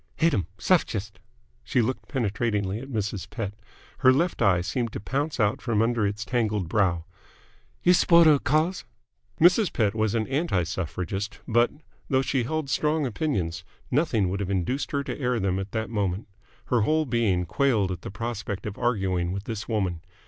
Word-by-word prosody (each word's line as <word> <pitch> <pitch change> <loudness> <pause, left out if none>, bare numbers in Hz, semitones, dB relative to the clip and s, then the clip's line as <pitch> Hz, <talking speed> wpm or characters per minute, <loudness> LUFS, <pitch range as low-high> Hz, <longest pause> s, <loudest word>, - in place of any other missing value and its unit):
"Hate 165 -1 +2
'em! 95 -6 0
Suff 175 - +3
gist!" 105 -1 -6 0.4
She - - 0
looked 125 +3 -1
penetratingly 105 -5 -1
at 135 +3 -9
Mrs. 105 -5 -3
Pett. 105 -4 -4 0.5
Her 130 -2 +6
left 165 +4 +1
eye 95 -5 +4
seemed 115 +6 -2
to - - -4
pounce 140 +8 -2
out 105 0 +2
from 115 -4 0
under 115 -2 +1
its 105 +1 -4
tangled 110 -6 0
brow. 85 -3 +1 0.8
"You 180 - +6
S'porter 170 -2 +6
of 145 - +4
th' - - -24
Cause?" 155 +5 +1 0.6
Mrs. 180 +4 +5
Pett 105 -3 +1
was 110 0 0
an 110 -1 +1
anti 135 - 0
Suffragist, 95 +3 -4
but, 120 +1 +4 0.4
though 130 -1 +3
she 130 -3 0
held 155 +2 -2
strong 150 +2 +1
opinions, 95 - -2 0.3
nothing 125 - +2
would 100 +2 -2
have 100 -2 -3
induced 100 +9 -1
her 140 -1 -1
to 135 0 -5
air 125 -3 0
them 95 -1 0
at 95 +1 -5
that 110 +1 -3
moment. 100 -2 -1 0.4
Her 120 -2 +2
whole 155 +7 +2
being 110 -8 +1
quailed 105 -1 +1
at 90 -2 -5
the - - -6
prospect 105 -1 -4
of 105 -2 -5
arguing 95 -7 0
with 100 +1 -4
this 110 -2 -5
woman. 95 -7 -1
110 Hz, 185 wpm, -26 LUFS, 95-135 Hz, 0.8 s, Her